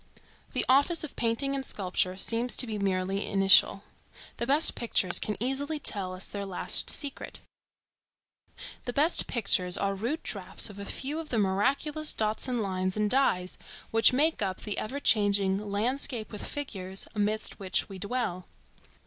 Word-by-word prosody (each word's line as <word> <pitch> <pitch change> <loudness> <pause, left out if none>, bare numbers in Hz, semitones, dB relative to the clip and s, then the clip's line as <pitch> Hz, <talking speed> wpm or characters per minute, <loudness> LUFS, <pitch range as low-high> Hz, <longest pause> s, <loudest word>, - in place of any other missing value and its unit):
The - - +1
office 285 +6 +3
of 305 - -7
painting 235 +4 0
and 275 -1 -3
sculpture 185 -4 -1
seems 235 +4 +1
to - - +7
be 215 -3 -4
merely 195 0 -1
initial. 195 -1 +4 0.5
The 235 - -3
best 290 +4 +3
pictures 190 -6 +1
can 210 - -3
easily 275 +6 -1
tell 195 -10 0
us 185 - -5
their 200 -1 -5
last 195 -2 +2
secret. 285 -2 -2 1.4
The 245 - -4
best 305 +6 +4
pictures 190 -6 +2
are 200 0 -1
rude 235 +11 -3
draughts 195 +1 -3
of 200 - -12
a 200 - -6
few 285 +9 -3
of 325 - -7
the 235 - -1
miraculous 275 +10 0
dots 215 +3 -1
and 245 -2 -1
lines 185 -1 -2
and 210 -1 0
dyes 185 -9 +1 0.3
which 225 0 +5
make 300 +4 +2
up 190 -2 -2
the 210 - -3
ever 265 +6 -4
changing 200 -5 +3
"landscape 220 +3 -2
with 210 - -6
figures" 195 -10 -5
amidst 215 0 -1
which 190 -2 -1
we 195 -2 -9
dwell. 200 -4 -3
215 Hz, 160 wpm, -28 LUFS, 195-265 Hz, 1.4 s, to